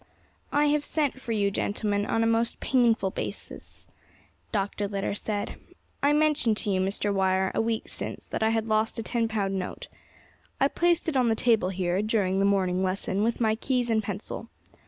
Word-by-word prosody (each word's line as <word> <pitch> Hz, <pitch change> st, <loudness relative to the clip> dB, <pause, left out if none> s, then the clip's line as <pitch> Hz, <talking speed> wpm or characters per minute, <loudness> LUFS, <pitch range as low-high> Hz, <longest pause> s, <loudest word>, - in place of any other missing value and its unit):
"I 290 Hz, +1 st, +3 dB
have 295 Hz, 0 st, +2 dB
sent 290 Hz, -3 st, -1 dB
for 235 Hz, -, -5 dB
you, 205 Hz, -2 st, +1 dB
gentlemen, 205 Hz, 0 st, -1 dB
on 225 Hz, -, +1 dB
a -, -, +2 dB
most 230 Hz, +1 st, +1 dB
painful 235 Hz, -7 st, +2 dB
business," -, -, -7 dB, 0.6 s
Dr. 205 Hz, -1 st, -1 dB
Litter 200 Hz, 0 st, -2 dB
said. 205 Hz, 0 st, -3 dB, 0.4 s
"I 285 Hz, -, +4 dB
mentioned 295 Hz, -7 st, +2 dB
to 210 Hz, -, -1 dB
you, 185 Hz, -1 st, +1 dB
Mr. 200 Hz, +2 st, 0 dB
Wire, 190 Hz, -1 st, +2 dB
a -, -, +1 dB
week 225 Hz, 0 st, -1 dB
since, -, -, -6 dB
that -, -, -3 dB
I 220 Hz, -, +3 dB
had 225 Hz, -1 st, 0 dB
lost 220 Hz, 0 st, +1 dB
a 225 Hz, -, -2 dB
ten 230 Hz, 0 st, 0 dB
pound 195 Hz, -3 st, -1 dB
note. 180 Hz, -, -6 dB, 0.7 s
I 275 Hz, -, +4 dB
placed 345 Hz, +1 st, +1 dB
it 320 Hz, -, -1 dB
on 250 Hz, -3 st, +3 dB
the 225 Hz, -, +2 dB
table 220 Hz, -5 st, +2 dB
here, 185 Hz, 0 st, 0 dB
during 205 Hz, -3 st, +1 dB
the 195 Hz, -, +3 dB
morning 190 Hz, -2 st, +2 dB
lesson, 190 Hz, +1 st, 0 dB
with 230 Hz, +2 st, 0 dB
my 220 Hz, -2 st, +3 dB
keys 245 Hz, +1 st, 0 dB
and 220 Hz, -1 st, +3 dB
pencil. 205 Hz, +3 st, -6 dB
220 Hz, 190 wpm, -27 LUFS, 195-235 Hz, 0.7 s, I